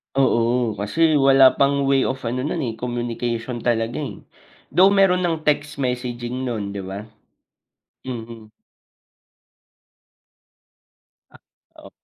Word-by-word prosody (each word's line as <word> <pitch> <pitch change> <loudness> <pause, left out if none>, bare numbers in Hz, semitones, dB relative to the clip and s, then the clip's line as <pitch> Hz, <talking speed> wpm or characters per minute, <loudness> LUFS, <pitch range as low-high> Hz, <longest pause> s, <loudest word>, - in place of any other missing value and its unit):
Oo, 120 -3 +2
kasi 155 +8 +2
wala 135 -1 +6
pang 140 0 +3
way 135 -1 +3
of 130 -1 -4
ano 120 +2 -2
nun, 140 +3 -2
eh, 115 -3 -4
communication 120 0 -3
talaga, 115 +1 -1
eh. 145 - -5 0.6
Though 185 +6 +6
meron 195 -2 +4
ng 160 -2 -3
text 145 0 0
messaging 125 -1 -3
nun, 105 -4 -3
'di 100 - -6
ba? 100 +2 -6 1.0
Mhm. 115 -3 -8 2.8
Ah, - - -17 0.5
o - - -11
125 Hz, 115 wpm, -21 LUFS, 115-140 Hz, 2.8 s, wala